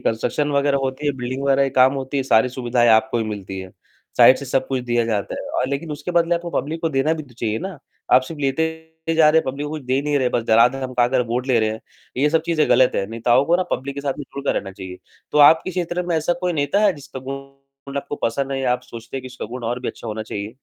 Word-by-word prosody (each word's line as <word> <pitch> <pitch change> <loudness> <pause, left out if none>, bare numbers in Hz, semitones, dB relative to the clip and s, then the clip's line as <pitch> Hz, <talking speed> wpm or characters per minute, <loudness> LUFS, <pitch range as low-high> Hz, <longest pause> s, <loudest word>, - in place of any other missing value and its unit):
Construction 145 +6 -1
वग़ैरह 140 0 +2
होती 135 +2 -3
है, 145 - +2
बिल्डिंग 130 +2 -4
वग़ैरह 140 0 +3
की 135 - -1
काम 130 +1 +5
होती 135 +1 -4
है, 135 - +1
सारी 125 -1 +3
सुविधाएँ 120 -1 +1
आपको 110 +1 +4
ही 115 - -1
मिलती 100 -3 -6
है। 95 -1 -9 0.5
साइड 130 - +8
से 140 - -7
सब 130 0 0
कुछ 130 -1 -1
दिया 120 -1 +1
जाता 105 -3 -2
है - - -7
और - - +1
लेकिन 145 +3 -3
उसके 150 +4 -5
बदले 170 0 +3
आपको 170 0 -4
पब्लिक 160 +1 -3
को 165 - 0
देना 135 +3 +1
भी 155 - -6
तो 130 -5 -18
चाहिए 110 -2 -2
ना, 185 -4 -6 0.3
आप 130 - +7
सिर्फ़ 145 +3 -8
लेते 135 +3 +1 0.5
जा 155 -1 +6
रहे 160 - +5
हैं, - - -11
पब्लिक 140 +3 -5
को 145 - -6
कुछ 155 -2 -5
दे 130 +1 0
नहीं 150 0 -1
रहे - - 0
हैं, 125 - +1
बस 120 - +1
डरा, 115 +1 +7
धमका 130 -2 0
कर 130 0 +2
वोट 125 +2 -2
ले 125 -3 +3
रहे 110 - +1
हैं, 110 - -6 0.4
ये 145 +3 +2
सब 160 0 +2
चीज़ें 160 -3 +1
गलत 130 0 +5
हैं। 100 - 0
नेताओं 120 +3 +2
को 170 +4 +3
ना 185 - +1
पब्लिक 135 +2 -3
के 140 - -5
साथ 140 -1 -1
में 145 - -5
जुड़कर 140 0 -1
रहना 95 - -3
चाहिए, 95 -1 -9 0.3
तो - - +2
आपके 160 +5 +6
क्षेत्र 175 -1 -2
में 170 - 0
ऐसा 160 +2 +1
कोई 180 -1 0
नेता 150 +6 +1
है, 200 - +5
जिसका 140 -4 -10
गुण 135 +1 -10
आपको 140 +1 -4
पसंद 135 +4 0
नहीं 135 -1 -2
है - - -2
या 125 - +3
आप 125 - -1
सोचते 115 +3 -9
हैं 135 - -5
कि 130 - -8
उसका 130 - -7
गुण 125 - -6
और 120 +2 -2
भी 125 - -3
अच्छा - - -8
होना 110 0 -4
चाहिए? 105 +1 -6
135 Hz, 280 wpm, -21 LUFS, 120-145 Hz, 0.5 s, साइड